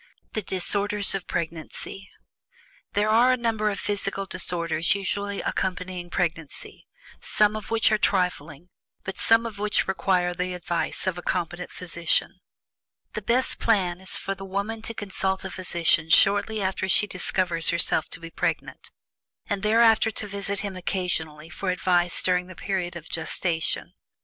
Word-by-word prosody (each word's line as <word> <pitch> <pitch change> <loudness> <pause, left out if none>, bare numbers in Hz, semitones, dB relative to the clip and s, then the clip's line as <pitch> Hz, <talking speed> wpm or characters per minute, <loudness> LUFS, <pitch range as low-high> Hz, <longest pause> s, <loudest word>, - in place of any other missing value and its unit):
THE 215 - -1
DISORDERS 200 +2 0
OF 195 -2 -4
PREGNANCY. 170 +3 -5 0.8
There 210 +1 +2
are 240 +3 +6
a 255 - +3
number 225 -3 0
of 200 - -3
physical 195 -1 -2
disorders 170 -2 0
usually 200 +1 -2
accompanying 185 -1 -3
pregnancy, 165 -4 -3 0.3
some 210 0 +3
of 215 - -6
which 225 -1 +3
are 215 - +3
trifling, 175 -5 0 0.3
but 190 -1 -6
some 225 +1 +4
of 220 -3 -6
which 210 0 +1
require 185 -2 +1
the 180 0 -2
advice 175 0 -2
of 185 -2 -1
a - - -7
competent 175 0 -2
physician. 170 -2 0 0.7
The - - -3
best 250 +2 +1
plan 185 -5 +2
is 190 - +1
for 195 - -3
the 195 - -9
woman 200 +4 -3
to 230 - -6
consult 190 -2 -2
a 190 - -4
physician 170 -3 +1
shortly 205 +3 +4
after 190 0 -1
she 210 - +4
discovers 180 -3 0
herself 170 -2 +3
to - - -5
be 165 0 -9
pregnant, - - -3 0.6
and 205 -3 -2
thereafter 225 +1 +5
to 215 - -4
visit 200 0 -3
him 200 -2 -4
occasionally 165 -4 -2
for 190 - -3
advice 180 -1 +2
during 180 0 +1
the 185 - -10
period 180 -3 -2
of 165 -2 -8
gestation. 165 0 -1
190 Hz, 155 wpm, -26 LUFS, 175-205 Hz, 0.8 s, are